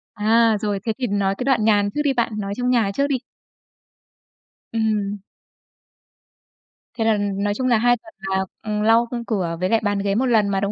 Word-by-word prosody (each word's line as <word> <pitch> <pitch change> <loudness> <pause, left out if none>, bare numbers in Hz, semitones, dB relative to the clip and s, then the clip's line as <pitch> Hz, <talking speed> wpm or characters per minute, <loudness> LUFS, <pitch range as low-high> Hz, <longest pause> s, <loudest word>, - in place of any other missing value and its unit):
À, 225 +1 +3
rồi. 205 -2 -1
Thế 225 - 0
thì 255 -2 -2
nói 195 -1 0
cái - - -3
đoạn 245 -5 +2
nhàn 205 -2 +3
trước 295 - +1
đi 280 -2 +2
bạn, 235 -2 0
nói 200 0 -3
trong 250 0 0
nhà 230 -5 +2
trước 280 +5 +1
đi. 280 - 0 1.6
Ừm. 210 -3 -1 1.8
Thế 225 -3 -2
là, 225 - +4
ừm, 200 -1 -2
nói 205 0 +1
chung 255 +4 -2
là 235 -3 +4
2 245 +2 +3
tuần 220 -1 -17 0.2
là, 190 - 0 0.2
ừm, 210 -1 -2
lau, 225 +2 +4
ư, 235 -1 -3
cửa 175 -7 -1
với 185 - 0
lại 225 +1 +3
bàn 205 -1 0
ghế 200 0 0
1 255 - +1
lần 225 -5 +3
mà, 195 -1 0
đúng 200 +1 -1
215 Hz, 215 wpm, -21 LUFS, 200-235 Hz, 1.8 s, là